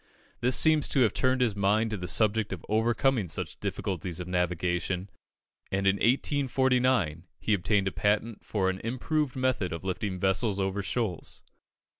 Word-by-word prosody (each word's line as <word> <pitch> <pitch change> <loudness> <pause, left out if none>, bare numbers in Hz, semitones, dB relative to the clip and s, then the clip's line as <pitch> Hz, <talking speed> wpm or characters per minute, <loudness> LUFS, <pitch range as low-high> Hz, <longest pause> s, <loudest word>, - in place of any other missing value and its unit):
This 125 +1 +2
seems 155 -2 +5
to 135 - +2
have 115 - +3
turned 130 0 +1
his 115 -5 +1
mind 105 +3 +1
to 110 - -2
the 90 -1 -5
subject 110 +2 +1
of 90 -4 -6
overcoming 115 -1 +1
such - - -5
difficulties 90 -2 -3
of 90 - -5
navigation, 90 +1 -1 0.6
and 95 0 -1
in 95 +1 +3
1849 125 - +1
he 110 - 0
obtained 100 +1 +1
a - - 0
patent 105 +2 -1
for 95 -3 -1
"an 95 - -7
improved 130 +4 -2
method 130 -7 0
of 85 +1 -5
lifting 95 0 -3
vessels 95 +2 +1
over 95 +1 -1
shoals." 95 -2 -3
105 Hz, 160 wpm, -28 LUFS, 95-125 Hz, 0.6 s, seems